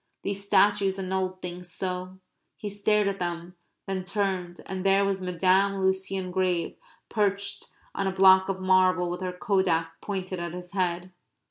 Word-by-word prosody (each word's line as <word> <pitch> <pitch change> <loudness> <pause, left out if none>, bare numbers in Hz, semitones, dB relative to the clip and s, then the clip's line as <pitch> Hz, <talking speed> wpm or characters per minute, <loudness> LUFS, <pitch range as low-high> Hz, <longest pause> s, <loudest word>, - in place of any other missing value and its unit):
These 200 0 -2
statues 200 -1 +3
annulled 185 -1 -2
things 180 0 -6
so! 185 +1 -4 0.4
He 210 - -5
stared 205 +1 +1
at 195 0 -2
them, 175 0 -4 0.3
then 190 -1 -3
turned, 185 -2 -2
and 190 -1 -4
there 195 0 +4
was 195 -1 -1
Madame 185 +2 +2
Lucien 190 -1 -1
Grave 180 -2 0 0.3
perched 200 -2 -1 0.3
on 195 - -1
a - - +1
block 190 0 +6
of 190 -1 -2
marble 185 -1 +3
with 180 - -5
her 185 -1 -2
kodak 180 -3 0
pointed 185 -2 -4
at 170 -1 -4
his 180 0 -8
head. 180 -2 -1
190 Hz, 155 wpm, -27 LUFS, 180-195 Hz, 0.4 s, block